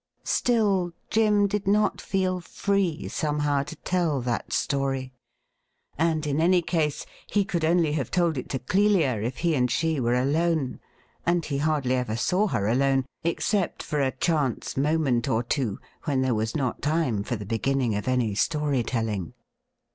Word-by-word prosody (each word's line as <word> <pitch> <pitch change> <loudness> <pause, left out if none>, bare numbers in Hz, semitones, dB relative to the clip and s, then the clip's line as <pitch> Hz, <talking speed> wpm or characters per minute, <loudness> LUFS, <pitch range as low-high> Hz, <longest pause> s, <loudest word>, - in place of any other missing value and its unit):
Still, 200 -7 +1 0.2
Jim 210 -2 +4
did 200 0 -2
not 210 +1 +2
feel 185 -1 0
free 190 -2 -1
somehow 150 -2 0
to 150 +4 -7
tell 165 -3 0
that 120 -1 -3
story, 135 -2 -1 0.8
and 160 0 +1
in 150 +1 0
any 175 +1 +4
case 160 -4 -1 0.2
he 205 -2 +1
could 170 -3 -2
only 165 -1 +3
have 140 -6 -2
told 170 -3 +1
it 130 - -5
to 135 - -1
Clelia 165 - +2
if 120 +4 -3
he 170 -2 +1
and 125 -4 +2
she 160 +4 0
were 120 -1 +1
alone; 145 +1 +1 0.4
and 175 -1 +1
he 140 -2 -2
hardly 145 -4 +1
ever 125 -4 -1
saw 180 - +1
her 100 - -1
alone, 135 +3 +2 0.2
except 180 +3 0
for 150 -2 -1
a 135 - +2
chance 140 -2 -1
moment 140 -4 +1
or 115 +2 +1
two 120 -4 -1 0.3
when 140 -4 +1
there 130 -1 +1
was 110 +3 -1
not 135 -5 -1
time 145 -8 +1
for 120 - -3
the 105 -2 -6
beginning 120 +3 0
of 105 +2 -3
any 125 -4 +1
story 145 +4 +1
telling. 110 -7 -3
145 Hz, 165 wpm, -26 LUFS, 125-170 Hz, 0.8 s, Jim